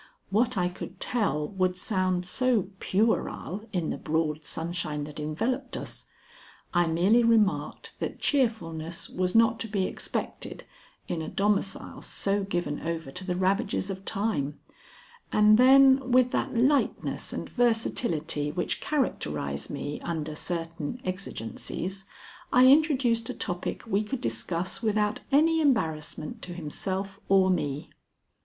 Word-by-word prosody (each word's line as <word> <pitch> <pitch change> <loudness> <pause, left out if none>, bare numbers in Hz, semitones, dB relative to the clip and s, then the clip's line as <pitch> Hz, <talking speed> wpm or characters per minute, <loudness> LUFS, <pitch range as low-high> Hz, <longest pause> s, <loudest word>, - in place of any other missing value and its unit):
What 225 +3 +2
I 180 -1 +2
could 180 +1 -8
tell 175 -11 0
would 185 -2 0
sound 185 -2 0
so 230 -1 +1
puerile 210 -1 0
in 175 -6 -1
the - - -4
broad 155 -1 -1
sunshine 160 -2 -3
that 150 +1 -7
enveloped 235 - -2
us. - - -6 0.7
I 175 -1 +3
merely 185 +9 +4
remarked 225 -4 +2
that - - -3
cheerfulness 170 - 0
was 180 +1 -1
not 225 0 +5
to 225 - -3
be 200 -3 0
expected - - -4 0.4
in 165 - -2
a 160 - -4
domicile 200 -1 -1
so 200 0 -1
given 175 -6 -2
over 165 -4 -4
to 185 +6 -5
the 180 -1 -2
ravages 190 +1 0
of 190 0 -7
time, 170 -10 -1 0.7
and 215 +1 +6
then 265 0 +6
with 250 0 +5
that - - -1
lightness 270 +4 +1
and - - -4
versatility 170 -11 0
which 175 +2 -2
characterize 75 - -2
me 145 +1 -4
under 160 -2 -3
certain 165 +4 -4
exigencies, 185 - -4 0.5
I 250 +1 +6
introduced 260 -5 +4
a - - -3
topic 175 0 -3
we 210 -3 +1
could 245 +5 -4
discuss 165 - -2
without 215 -1 +1
any 320 +3 +4
embarrassment 160 - 0
to 175 - -6
himself 190 +4 -4
or 190 -1 +5
me. 145 -5 -2
190 Hz, 135 wpm, -28 LUFS, 165-230 Hz, 0.7 s, and